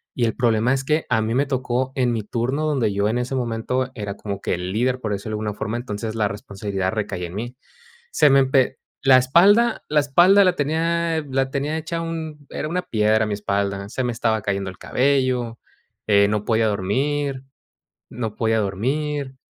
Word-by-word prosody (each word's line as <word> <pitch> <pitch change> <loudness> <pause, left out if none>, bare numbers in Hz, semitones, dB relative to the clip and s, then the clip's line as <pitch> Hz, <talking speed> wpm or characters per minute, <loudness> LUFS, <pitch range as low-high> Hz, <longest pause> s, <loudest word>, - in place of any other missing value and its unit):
Y 120 - +1
el 110 - -1
problema 120 +1 +2
es 135 - -3
que, 155 +3 0
a 110 - +2
mí 110 - -1
me 140 +3 +1
tocó 130 -1 -1
en 125 -2 +1
mi 115 -2 -1
turno, 125 +8 -2
donde 130 -9 +1
yo 100 +1 +1
en 115 - 0
ese 125 +2 -3
momento 125 +1 -1
era 105 -3 -4
como 100 -1 -6
que - - -1
el 90 +1 -3
líder, 125 +4 0
por 110 - -3
decirlo 100 +2 -4
de - - -3
alguna 105 0 -2
forma, 110 +3 -3
entonces 110 -2 -4
la 110 -2 +1
responsabilidad 100 -2 -4
recaía 100 -4 -3
en 85 - -11
mí. 120 +5 -5 0.6
Se 150 - +4
me 135 - +6
empe 130 -1 +2 0.2
la 135 -1 +7
espalda, 200 - +4
la 150 0 +4
espalda 175 +8 +5
la 185 -2 +3
tenía 165 +2 0
la 135 0 0
tenía 145 +3 -2
hecha 160 +1 -3
un 160 -3 -6
era 155 - -4
una 180 +3 -1
piedra 110 -7 +1
mi 105 - -2
espalda. 100 -1 -2
Se 130 - -2
me 125 -1 -1
estaba 115 -1 0
cayendo 100 -2 -2
el 95 - -14
cabello, 130 -3 0 0.5
eh, 100 -1 +5
no 105 0 -1
podía 110 -1 +2
dormir. 135 +7 -1 0.6
No 110 -3 -5
podía 110 -1 +1
dormir, 135 +8 -2
120 Hz, 195 wpm, -22 LUFS, 105-140 Hz, 0.6 s, la